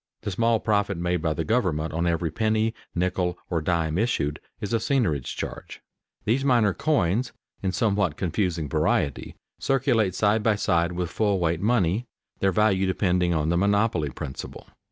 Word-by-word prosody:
The 100 - -2
small 115 +2 +2
profit 100 -3 0
made 90 0 -1
by 80 -1 0
the 80 - -1
government 90 -9 0
on 85 +2 0
every 85 -1 0
penny, 110 +2 +1 0.2
nickel, 90 0 0
or 85 -2 +1
dime 80 0 0
issued, 75 -11 0 0.2
is 105 +2 -4
a - - +4
seigniorage 110 - 0
charge. - - -6 0.5
These 120 +5 +1
minor 120 -7 +3
coins, 120 - 0 0.3
in 95 - 0
somewhat 100 -4 +1
confusing 85 -3 -1
variety, 70 0 0 0.2
circulate 120 -8 +1
side 105 +2 +2
by 110 0 +2
side 85 -4 +1
with 90 -1 -3
full 105 -1 +1
weight 85 -1 0
money, 110 0 +1 0.3
their 95 - +2
value 95 -1 +2
depending 90 -2 +1
on 75 0 0
the 85 - +2
monopoly 100 -5 +2
principle. 65 0 -7
95 Hz, 160 wpm, -25 LUFS, 85-110 Hz, 0.5 s, a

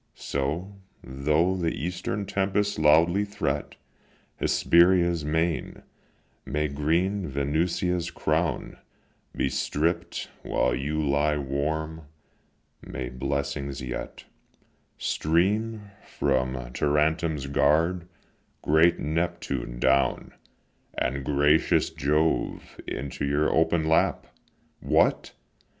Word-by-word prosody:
So, 80 +9 -3 0.3
though 75 +7 +1
the 85 -3 -1
eastern 90 +5 -3
tempests 100 0 0
loudly 85 +6 +4
threat 100 0 -3 0.6
Hesperia's 85 -1 +3
main, 80 0 -1 0.6
may 75 +2 -1
green 85 +7 0
Venusia's 85 +5 -1
crown - - -1 0.6
Be - - 0
stripp'd, 80 +4 -1
while 60 - 0
you 75 +4 -1
lie 75 +2 +2
warm; 75 +3 -3 0.7
may 65 0 -6
blessings 70 +1 -3
yet 60 -1 -6 0.7
Stream 105 +6 0
from 65 -2 -1 0.2
Tarentum's 75 +1 +1
guard, 80 +5 +2 0.6
great 80 +3 +4
Neptune, 70 -6 -3
down, 70 +2 +1 0.6
And 65 +2 -1
gracious 75 +4 +2
Jove, 75 0 -1
into 70 0 -5
your 70 +2 +1
open 80 0 +2
lap! 80 - +2 0.5
What! - - +1
75 Hz, 85 wpm, -26 LUFS, 70-85 Hz, 0.7 s, loudly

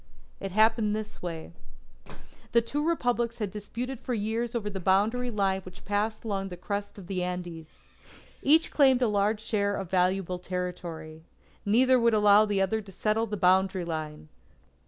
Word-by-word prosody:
It 195 - -5
happened 215 +1 +3
this 215 0 -6
way: 165 - -6 1.0
The 235 - +6
two 290 +6 -2
Republics 245 -8 0
had 210 -4 -3
disputed 230 +5 -5
for 250 - -3
years 225 +3 -2
over 220 -3 -2
the 200 -2 -4
boundary 210 +7 +2
line 195 -3 0
which 185 -1 -13
passed 210 +2 -1
along 195 -3 -2
the 180 - -8
crest 200 +3 -4
of 195 - -10
the 185 0 -3
Andes. 175 -3 -5 0.7
Each 315 +3 +4
claimed 265 -3 +4
a - - +3
large 210 +1 +1
share 205 -2 0
of 195 -3 -5
valuable 185 0 +1
territory. 175 -3 -5 0.5
Neither 255 +4 +5
would 235 -1 +3
allow 210 0 +6
the 200 -2 +1
other 220 +3 0
to 200 -2 -13
settle 215 +4 0
the 210 0 -4
boundary 190 0 +3
line. 155 -2 -5
205 Hz, 165 wpm, -28 LUFS, 185-225 Hz, 1.0 s, The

